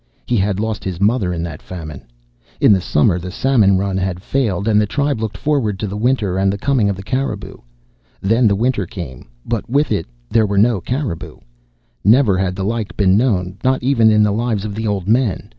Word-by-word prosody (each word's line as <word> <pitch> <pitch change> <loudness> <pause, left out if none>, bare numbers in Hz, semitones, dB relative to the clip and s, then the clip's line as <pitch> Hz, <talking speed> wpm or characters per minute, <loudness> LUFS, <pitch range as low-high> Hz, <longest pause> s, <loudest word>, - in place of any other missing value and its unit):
He 120 - 0
had 100 0 0
lost 110 -1 -3
his 90 -3 -4
mother 100 -2 +1
in 85 -1 -3
that 80 -4 -6
famine. 80 -6 -8 0.6
In - - +6
the 95 - +1
summer 85 +3 +2
the 90 +1 -6
salmon 105 -3 +3
run 95 0 -1
had 95 -2 -2
failed, 105 -8 -1
and 105 -1 +4
the 105 - 0
tribe 140 0 -1
looked 110 -2 -3
forward 135 -10 0
to 105 - -3
the 100 0 -5
winter 105 -5 0
and 95 0 +2
the 100 - -3
coming 125 -3 +1
of 100 - -1
the 95 - -9
caribou. 110 -3 -3 0.6
Then 115 +4 +2
the 100 - +2
winter 110 -3 0
came, 70 -13 -8 0.2
but 115 -2 -3
with 140 +2 +1
it 100 -6 -1 0.2
there 110 - +2
were 100 0 -1
no 110 -1 +3
caribou. 125 - -4 0.7
Never 110 -2 +4
had 95 -1 -1
the 95 - -3
like 115 0 -3
been 95 -2 +4
known, 95 -5 0
not 130 -1 +1
even 120 -4 +4
in 105 -1 +4
the 105 - +2
lives 110 -1 -1
of 105 - -4
the 110 +2 -3
old 100 -3 -2
men. 115 -3 +1
105 Hz, 215 wpm, -18 LUFS, 95-115 Hz, 0.7 s, In